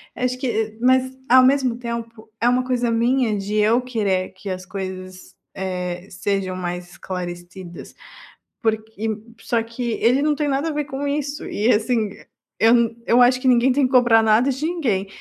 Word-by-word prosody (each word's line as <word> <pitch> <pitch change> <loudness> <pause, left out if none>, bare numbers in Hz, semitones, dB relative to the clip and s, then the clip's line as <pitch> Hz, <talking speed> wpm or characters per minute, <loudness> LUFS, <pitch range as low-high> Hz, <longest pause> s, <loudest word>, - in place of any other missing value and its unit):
acho 250 0 -1
que 225 -4 -2
mas 260 +1 +3
ao 255 +1 +7
mesmo 260 -3 +2
tempo, 230 -2 -6
é 240 - +4
uma 250 +1 +2
coisa 245 -2 0
minha, 230 -1 +1
de 200 +2 -4
eu 220 +3 +4
querer 205 -7 -1
que 190 +1 -8
as 185 0 -5
coisas, 185 -1 -7 0.2
eh, 180 -1 -4
sejam 190 0 -2
mais 180 -1 -5
esclarecidas, 175 -1 -8 0.7
porque 220 -1 -2 0.3
só 230 -1 -1
que 230 +1 -4
ele 250 +6 +2
não 300 0 +2
tem 295 -1 -1
nada 275 +3 0
a 310 - -3
ver 295 0 -1
com 285 0 -4
isso, 285 0 -3
e 220 +4 +1
assim 220 0 +1 0.5
eu 225 +1 +5 0.3
eu 245 +1 +5
acho 250 +1 +5
que 260 - -2
ninguém 250 +1 +4
tem 275 +1 +2
que 255 - -2
cobrar 240 -3 +6
nada 220 +5 +3
de 270 +4 -3
ninguém, 245 - -1
230 Hz, 175 wpm, -21 LUFS, 195-255 Hz, 0.7 s, ao